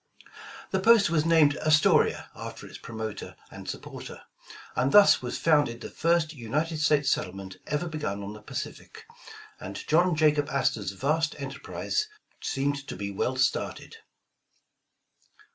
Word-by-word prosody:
The 190 - +1
post 215 -1 +5
was 155 -2 +2
named 155 -3 +5
"Astoria" 155 -1 +3
after - - -8
its - - -11
promoter 110 -2 -6 0.2
and - - -9
supporter, - - -8 0.5
and 130 +2 +1
thus 205 -1 +7
was 125 - -4
founded 145 -7 +2
the - - -7
first 165 -1 +1
United 150 +6 -2
States 150 -2 +3
settlement 95 0 -3
ever 150 +3 -1
begun 150 -11 -4
on 100 +1 -6
the 105 - -11
Pacific, - - -7 0.5
and - - -7
John 175 +2 +3
Jaxiob 150 -2 +3
Astor^s 105 -8 -1
vast 155 +5 0
enterprise 140 - -3 0.3
seemed 140 0 -2
to - - -6
be 100 +1 -4
well 125 +6 -1
started. 130 0 -1
145 Hz, 135 wpm, -27 LUFS, 115-160 Hz, 0.5 s, thus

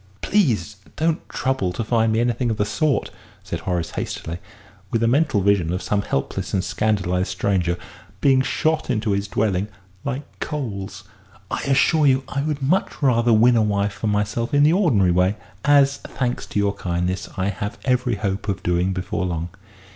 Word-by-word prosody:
"Please 125 - +1 0.2
don't 160 +1 -1
trouble 130 -9 -1
to 115 - -2
find 115 0 +2
me 110 - +1
anything 120 +1 0
of 110 - -1
the 105 - +1
sort!" 140 +7 0 0.3
said 85 - -4
Horace, 85 0 -2
hastily, 85 +2 -4 0.5
with 115 0 0
a - - +3
mental 130 -4 +2
vision 95 -4 +2
of 90 - -2
some 105 -1 0
helpless 70 -4 -2
and 95 - +1
scandalised 95 -1 0
stranger 90 -2 0 0.4
being 135 -2 +4
shot 155 +3 0
into 110 -3 0
his 100 0 0
dwelling 100 -1 0 0.4
like 140 +1 -3 0.2
coals. 100 -9 -4 0.5
"I - - -1
assure 140 +3 +3
you 135 0 +3
I 140 - -2
would 150 -1 -2
much 160 +1 0
rather 120 -3 +3
win 115 +2 +5
a 115 - +4
wife 100 -1 0
for 110 - -4
myself 105 +5 0
in 145 - +5
the 155 +2 +5
ordinary 125 - +3
way 90 +3 +2 0.3
as, 140 -1 +4
thanks 125 -2 -3
to - - -5
your 100 0 +1
kindness, 90 0 -2
I 95 +1 0
have 100 +1 -4
every 125 -2 +1
hope 100 0 -3
of 95 -2 -2
doing 90 +2 +1
before 90 0 -2
long." 85 0 -3
105 Hz, 175 wpm, -22 LUFS, 95-130 Hz, 0.5 s, win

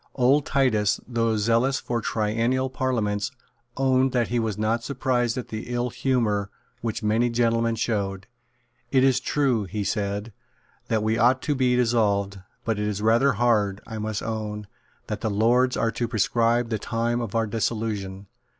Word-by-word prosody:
Old 135 +3 +3
Titus, 110 -7 +2
though 115 -2 0
zealous 115 +6 +2
for 120 -1 -2
triennial 115 +5 0
parliaments, 105 -6 -1 0.5
owned 130 -1 +2
that 120 -3 +1
he 120 +1 0
was 110 -3 -2
not 110 +2 0
surprised 125 -3 0
at 125 - -5
the 110 0 -6
ill 120 0 -1
humour 115 -5 0 0.3
which 115 0 -3
many 110 +3 +2
gentlemen 115 -1 +1
showed. 100 -4 -2 0.6
"It 130 -1 +3
is 135 -1 +4
true," 130 -6 +1
he 100 +2 -3
said, 100 +1 -2 0.5
"that 110 -1 0
we 110 +1 +1
ought 125 +3 +3
to 150 - +1
be 130 -2 +2
dissolved; 105 -5 +1 0.3
but 110 -2 -1
it 105 - -1
is 105 -1 -2
rather 120 +5 +4
hard, 105 -4 +1
I 110 -1 -6
must 110 -1 -3
own, 105 -2 -4 0.4
that - - -5
the 110 - 0
Lords 120 +5 +2
are 115 - +1
to 120 - -2
prescribe 115 +1 +1
the 110 - 0
time 120 +1 -1
of 115 -2 -5
our 115 0 +2
dissolution. 105 -3 -3
115 Hz, 165 wpm, -25 LUFS, 105-125 Hz, 0.6 s, is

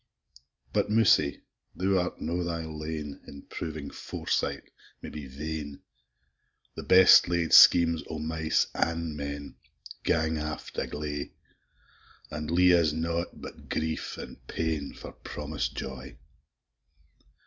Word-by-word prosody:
But, - - +1
Mousie, 105 -9 +3 0.3
thou 95 0 +2
art 90 0 -3
no 85 +2 -2
thy 85 -1 -3
lane, 75 -2 -6
In 70 0 -11
proving 80 -3 -6
foresight - - -2 0.4
may - - -8
be 75 -3 -7
vain: 75 +1 -6 0.9
The - - -6
best 95 -1 +7
laid 85 -2 0
schemes 85 -2 +8
o' 80 - -4
mice 80 +1 0
an' 85 -2 -1
men, 70 0 -6 0.5
Gang 80 -1 +1
aft 75 0 -5
a - - -2
gley, 75 -1 -5 1.0
An' 75 +1 -4
lea'e 90 +1 +5
us 75 -3 +1
nought 85 +2 -2
but - - -11
grief 80 0 -2
and - - -8
pain, 80 -3 -2
For - - -9
promis'd 75 +1 -5
joy. 65 -1 -7
80 Hz, 125 wpm, -28 LUFS, 75-85 Hz, 1.0 s, schemes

